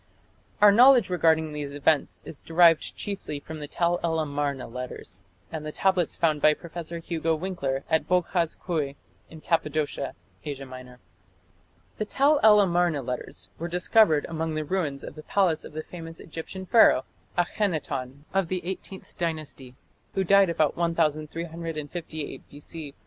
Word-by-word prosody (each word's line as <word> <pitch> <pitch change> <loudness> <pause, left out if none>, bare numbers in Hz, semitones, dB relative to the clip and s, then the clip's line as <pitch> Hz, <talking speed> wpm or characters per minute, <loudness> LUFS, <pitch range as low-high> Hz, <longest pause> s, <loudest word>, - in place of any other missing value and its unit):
Our 205 - +10
knowledge 245 -2 +6
regarding 160 -3 +2
these 145 -1 -5
events 145 +1 +1
is 145 - -9
derived 165 -1 +4
chiefly 195 -7 -5
from 155 +2 -8
the 150 - -6
Tell 175 +3 0
el 165 -1 +1
Amarna 145 -3 -2
letters, 115 -6 -7 0.3
and 160 -2 -5
the 155 - -5
tablets 185 -1 +1
found 155 -3 +1
by 155 0 +5
Professor 170 0 -7
Hugo 165 -1 -1
Winckler 140 -7 -3
at 160 0 +1
Boghaz 180 -2 +1
Köi 150 -6 -2 0.3
in 160 -1 -12
Cappadocia, 150 -4 -1 0.3
Asia 140 -2 -5
Minor. 130 -1 -11 1.0
The 215 - 0
Tell 280 +6 +3
el 210 -1 +7
Amarna 175 -6 +1
letters 125 0 -5
were 170 - -3
discovered 175 -2 +3
among 160 -1 -3
the 155 0 -2
ruins 150 -5 -2
of - - -7
the 155 - -10
palace 175 -1 +1
of - - -11
the 155 +1 -4
famous 165 -1 -9
Egyptian 165 +4 -7
Pharaoh, 185 - +5 0.3
Akhenaton, 155 -8 -2
of 195 -2 +1
the 180 0 -3
Eighteenth 190 +1 -7
Dynasty, 155 -6 -4 0.4
who 195 - +2
died 195 0 +5
about 155 -3 +1
1358 165 -1 -3
B.C. 145 0 -8
160 Hz, 150 wpm, -26 LUFS, 145-175 Hz, 1.0 s, Our